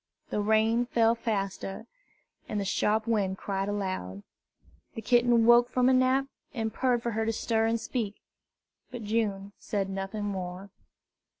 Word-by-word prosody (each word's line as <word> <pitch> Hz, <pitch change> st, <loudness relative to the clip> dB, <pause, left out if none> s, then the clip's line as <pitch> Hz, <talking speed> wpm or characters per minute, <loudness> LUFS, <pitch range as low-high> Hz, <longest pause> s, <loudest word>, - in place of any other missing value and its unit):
The 210 Hz, -, 0 dB
rain 220 Hz, +3 st, +2 dB
fell 230 Hz, -2 st, +3 dB
faster, 200 Hz, -4 st, -3 dB, 0.6 s
and 210 Hz, -, -1 dB
the 200 Hz, -, -2 dB
sharp 215 Hz, +3 st, +1 dB
wind 200 Hz, -4 st, 0 dB
cried 195 Hz, 0 st, -2 dB
aloud. 185 Hz, -, -3 dB, 0.7 s
The 225 Hz, -, -5 dB
kitten 240 Hz, -1 st, +4 dB
woke 240 Hz, +1 st, +6 dB
from 250 Hz, 0 st, +3 dB
a -, -, +4 dB
nap, 260 Hz, +1 st, +3 dB, 0.3 s
and 220 Hz, -2 st, -2 dB
purred 245 Hz, -1 st, +1 dB
for 235 Hz, -, -1 dB
her 225 Hz, 0 st, -1 dB
to 225 Hz, -, 0 dB
stir 225 Hz, 0 st, 0 dB
and 230 Hz, 0 st, 0 dB
speak; 220 Hz, -3 st, -3 dB, 0.7 s
but 245 Hz, -3 st, -7 dB
June 205 Hz, -2 st, -1 dB
said 195 Hz, -2 st, -2 dB
nothing 195 Hz, +2 st, -4 dB
more. 190 Hz, -1 st, -5 dB
220 Hz, 155 wpm, -28 LUFS, 195-235 Hz, 0.7 s, woke